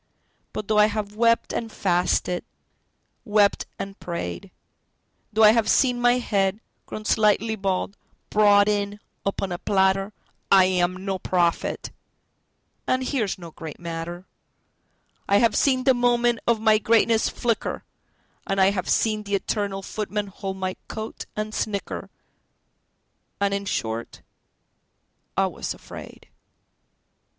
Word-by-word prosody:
But 210 - -5
though 215 -1 +3
I 210 - +7
have 210 -1 -4
wept 230 +1 +2
and 225 -1 -3
fasted, 180 -1 0 0.8
wept 205 -3 +2
and 195 0 -7
prayed, 90 - -5 0.8
Though 220 +1 +3
I 210 - +9
have 225 -1 +2
seen 250 -3 +3
my 245 +1 +4
head 200 -4 0 0.3
(grown 215 - -7
slightly 215 +1 +2
bald) 195 -1 -2 0.4
brought 205 -1 +5
in 205 0 -1 0.3
upon 195 -1 -2
a 175 - -3
platter,I 195 0 +2
am 185 0 0
no 195 -1 -2
prophet—and 180 +8 -3
here's 245 -7 -1
no 170 -3 -10
great 160 -1 -9
matter;I 175 +3 -6
have 230 +1 +3
seen 260 -2 +3
the 265 - +5
moment 240 -1 +2
of 235 -2 +3
my 215 -1 +4
greatness 225 0 +3
flicker, 235 -2 -2 0.6
And 195 0 0
I 190 +1 +5
have 185 -3 -3
seen 215 -1 +2
the 200 -1 -2
eternal 200 -1 -2
Footman 210 +1 -3
hold 195 0 -6
my 185 -1 -3
coat, 220 0 -6
and 215 0 -3
snicker, 205 -3 -3 1.3
And 200 0 +1
in 200 0 -2
short, 115 - -3 1.1
I - - +4
was - - -4
afraid. - - -11
205 Hz, 125 wpm, -24 LUFS, 190-220 Hz, 1.3 s, I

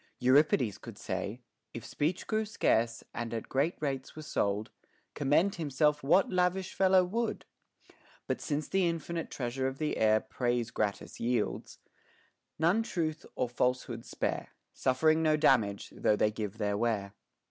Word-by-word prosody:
Euripides 130 -4 +3
could 115 -4 -10
say, 100 +6 -4 0.3
If 115 - -6
speech 160 +5 -1
grew 220 0 0
scarce, 115 - +1
and 115 -1 -4
at 115 - -5
great 140 +6 +1
rates 135 -3 -3
were 155 - -7
sold, 105 -7 -1 0.4
Commend 150 +8 +2
himself 150 0 +2
what 170 +9 +3
lavish 185 +1 +1
fellow 190 -1 +5
would? 230 +6 -2 0.8
But - - -2
since 150 -1 -2
the 190 -2 +2
infinite 165 0 -4
treasure 130 +1 -2
of 135 0 -4
the 155 0 -1
air 110 0 +4
Praise 120 0 -2
gratis 100 -7 -3
yields, 120 -2 -1 0.8
none 170 +8 +3
truth 160 -8 -3
or 125 - 0
falsehood 125 -1 -1
spare; - - -3 0.3
Suffering 155 +5 +2
no 155 -1 +3
damage, 115 -9 +2
though 105 - +2
they 105 0 +2
give 105 -1 -5
their 105 -2 0
ware. 105 -3 -1
135 Hz, 145 wpm, -31 LUFS, 115-160 Hz, 0.8 s, fellow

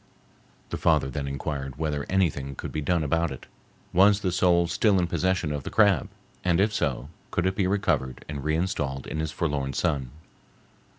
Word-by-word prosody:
The - - -2
father 65 - +2
then 70 +1 -3
inquired 70 0 -4
whether 75 -2 -2
anything 70 -8 0
could - - -6
be 75 - -2
done 85 +2 +1
about 85 +3 +1
it; 65 - -8 0.5
was 100 +3 +5
the 95 - 0
soul 85 -1 +3
still 100 +4 +2
in 90 - +2
possession 95 -2 0
of 75 -1 -2
the - - -6
crab, 105 -2 +3 0.3
and 85 -1 +2
if 105 +2 +2
so, 70 - -1 0.2
could 90 - -1
it 95 0 +1
be 95 -3 +1
recovered 90 -10 0
and 75 -2 -5
re 80 +1 +1
installed 75 -7 -2
in 80 - -4
his 80 -1 -2
forlorn 70 -5 -2
son? 70 -3 0
80 Hz, 185 wpm, -26 LUFS, 70-95 Hz, 0.5 s, was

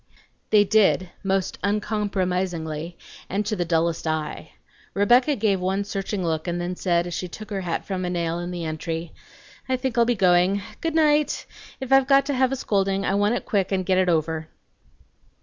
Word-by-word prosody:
They 210 -1 +6
did, 195 -3 +3
most 195 -1 -1
uncompromisingly, 185 -6 -2 0.3
and 205 +3 -1
to 215 +1 -1
the 175 -3 -1
dullest 165 0 0
eye. 155 -1 -3 0.4
Rebecca 245 +8 +4
gave 205 -4 +1
one 190 +2 0
searching 195 -1 -3
look, 160 0 -2
and 175 0 -1
then 175 +1 -3
said, 175 -2 +1
as 175 - -5
she 180 - -3
took 215 +4 -10
her 195 -1 -2
hat 175 -2 -3
from 185 -2 -3
a 180 - -1
nail 170 -1 -1
in 175 0 -4
the 175 -2 -4
entry, 160 +1 -4 0.6
"I 260 - +2
think 255 -2 -3
I'll 235 - +5
be 245 +1 +1
going. 185 +1 +3 0.2
Good 325 -1 -2
night! 300 -2 +2 0.3
If 265 0 -1
I've 270 -1 +5
got 275 0 +5
to 285 - -1
have 260 0 +2
a - - 0
scolding, 195 -4 0
I - - +1
want 205 +3 +2
it - - -4
quick, 200 -5 0
and 190 -1 0
get 185 0 +2
it 185 -1 +2
over." 160 -1 0
190 Hz, 195 wpm, -24 LUFS, 175-215 Hz, 0.6 s, They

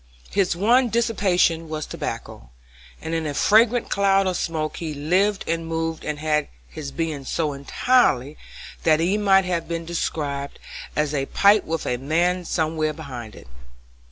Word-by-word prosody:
His 190 -3 +1
one 240 +7 +3
dissipation 190 -8 +1
was 155 -1 -4
tobacco, - - -6 0.5
and 160 - -4
in 165 -1 -1
a 145 - -4
fragrant 225 - +3
cloud 195 -1 +3
of 185 -1 0
smoke 155 -2 -2
he 160 -3 -4
lived 185 +8 +1
and 165 0 -2
moved 165 0 -3
and 150 -1 -3
had 150 -1 0 0.2
his 150 -3 -7
being 160 -4 -3
so 150 +2 -1
entirely 140 - +2 0.5
that 155 -1 +3
he 175 +5 +2
might 195 -2 +4
have 175 -2 -2
been 165 0 -4
described 145 -4 -3 0.4
as 150 -1 0
a 135 -2 -1
pipe 205 +1 +4
with 165 0 -3
a 125 - -1
man 170 +7 0
somewhere 155 -2 -1
behind 125 -8 -8
it. - - -14
165 Hz, 155 wpm, -23 LUFS, 150-190 Hz, 0.5 s, might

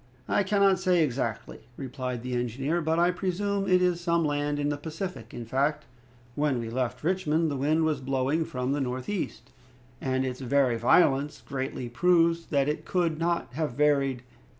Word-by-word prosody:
"I - - +2
cannot 195 -1 +3
say 180 -3 +3
exactly," 115 -5 -3 0.2
replied 125 -2 -4
the 125 0 -4
engineer, 130 +7 -1
"but 160 +1 0
I 175 +1 +4
presume 195 +2 -1
it 180 0 +4
is 175 -1 +1
some 170 -1 +1
land 145 0 0
in 145 0 0
the 145 - -1
Pacific. 160 - -6
In 120 - -7
fact, 145 +5 0 0.5
when 145 -1 +1
we 115 -1 -5
left 125 +1 -2
Richmond, 165 -2 +1
the - - -2
wind 150 +4 +1
was 155 -3 0
blowing 135 +4 0
from 125 -3 -3
the 145 0 0
northeast, 130 +9 -4 0.5
and 130 0 0
its 125 -1 -4
very 130 -1 +2
violence 140 +4 +3
greatly 130 -2 -4
proves 170 +5 +2
that 140 -2 +1
it 150 - -2
could 170 -4 0
not 170 -7 -1
have 150 -2 -2
varied. 140 -3 +2
145 Hz, 175 wpm, -27 LUFS, 130-170 Hz, 0.5 s, I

